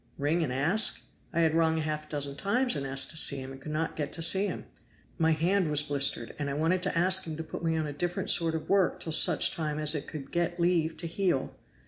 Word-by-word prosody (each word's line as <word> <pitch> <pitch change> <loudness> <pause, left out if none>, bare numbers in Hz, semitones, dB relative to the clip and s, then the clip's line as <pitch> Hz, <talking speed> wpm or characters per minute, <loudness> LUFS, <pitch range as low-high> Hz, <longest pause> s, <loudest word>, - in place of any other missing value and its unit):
"Ring 150 +5 0
and 140 - -3
ask? 160 +12 +2 0.3
I 170 -2 0
had 160 -1 +2
rung 160 0 +1
half 155 -1 -4
a - - -26
dozen 140 -2 -3
times 245 - 0
and 140 -2 -4
asked 135 0 +2
to 160 - -4
see - - +7
him 130 0 -7
and 135 0 -12
could 155 - -8
not 160 +2 -3
get 145 -2 -4
to 165 - -3
see 190 +5 +5
him. - - -6 0.5
My 160 0 +2
hand 170 +3 0
was 150 -1 +2
blistered, 140 -5 0
and 145 -1 -3
I 140 - -4
wanted 165 +5 0
to 185 -2 -2
ask 185 +1 +3
him 155 -1 -6
to 160 - -5
put 160 - -8
me 165 -1 0
on 155 - -2
a 145 - -6
different 175 +4 -2
sort 165 -1 +2
of 160 - -6
work 195 -2 +1
till 160 - -5
such - - +4
time 150 -2 -3
as 155 0 +1
it 150 -2 -5
could 140 -3 -9
get 175 0 -2
leave 170 -2 0
to 170 - -6
heal." 175 -5 -2
160 Hz, 260 wpm, -28 LUFS, 145-170 Hz, 0.5 s, see